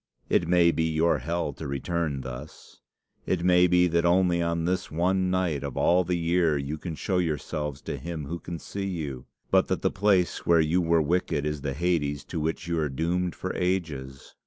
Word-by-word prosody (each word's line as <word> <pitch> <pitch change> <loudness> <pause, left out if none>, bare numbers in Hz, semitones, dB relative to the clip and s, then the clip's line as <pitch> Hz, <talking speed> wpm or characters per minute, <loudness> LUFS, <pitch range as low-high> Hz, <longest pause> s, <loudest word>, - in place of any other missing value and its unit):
'It 85 - +2
may 85 -1 +5
be 80 -1 0
your 80 +1 +2
hell 85 -3 -2
to 80 - -7
return 75 +1 -2
thus. 65 +3 -10 0.5
It 85 -2 0
may 90 0 +5
be 90 0 +4
that 85 -1 +1
only 85 0 +3
on 85 -1 -1
this 90 +1 -1
one 90 +3 +1
night 90 -6 0
of 70 -3 -5
all 90 +1 +4
the 90 0 -1
year 85 -2 +2
you 70 +3 -4
can 85 -1 -5
show 90 +3 -1
yourselves 75 -3 -3
to 70 - -4
him 80 0 -5
who 85 +4 -5
can 85 0 -6
see 100 +4 -5
you, 75 -9 -5 0.2
but - - +4
that - - -2
the - - +2
place 95 -3 +1
where 85 -1 +4
you 80 +3 +2
were 85 -1 +3
wicked 75 -2 0
is 75 -1 -2
the 70 -1 -2
Hades 75 -4 0
to - - -5
which 80 +2 -2
you 85 -1 0
are 75 -2 0
doomed 85 +6 -1
for 95 - -4
ages. 80 -8 -3
85 Hz, 205 wpm, -27 LUFS, 75-90 Hz, 0.5 s, may